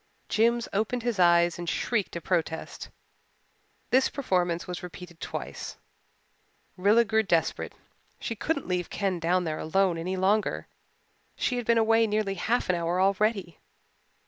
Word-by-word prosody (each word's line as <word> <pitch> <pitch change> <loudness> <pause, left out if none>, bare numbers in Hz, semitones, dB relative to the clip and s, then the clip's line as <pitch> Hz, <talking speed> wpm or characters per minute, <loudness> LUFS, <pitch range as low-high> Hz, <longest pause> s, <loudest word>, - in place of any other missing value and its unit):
Jims 235 +1 +2
opened 220 +4 0
his 235 -5 -1
eyes 175 -1 +4
and 175 -1 -3
shrieked 210 -8 -1
a 170 - -3
protest. 165 -3 -2 1.0
This 260 +1 +4
performance 180 -9 0
was 180 -1 -5
repeated 175 -1 -10
twice. - - -6 1.0
Rilla 210 +5 +4
grew 220 0 +2
desperate. 170 -6 0 0.5
She 230 - -3
couldn't 295 +5 -2
leave 180 -1 -1
Ken 195 -3 -1
down 175 +2 +1
there 155 -2 -3
alone 180 +1 +1
any 185 +3 -2
longer 200 +3 +1 0.7
she 250 - 0
had 245 - -4
been 235 0 +4
away 225 0 +4
nearly 210 -2 0
half 225 +6 0
an 185 - +2
hour 170 +1 0
already. 195 -2 +1
190 Hz, 145 wpm, -27 LUFS, 175-225 Hz, 1.0 s, eyes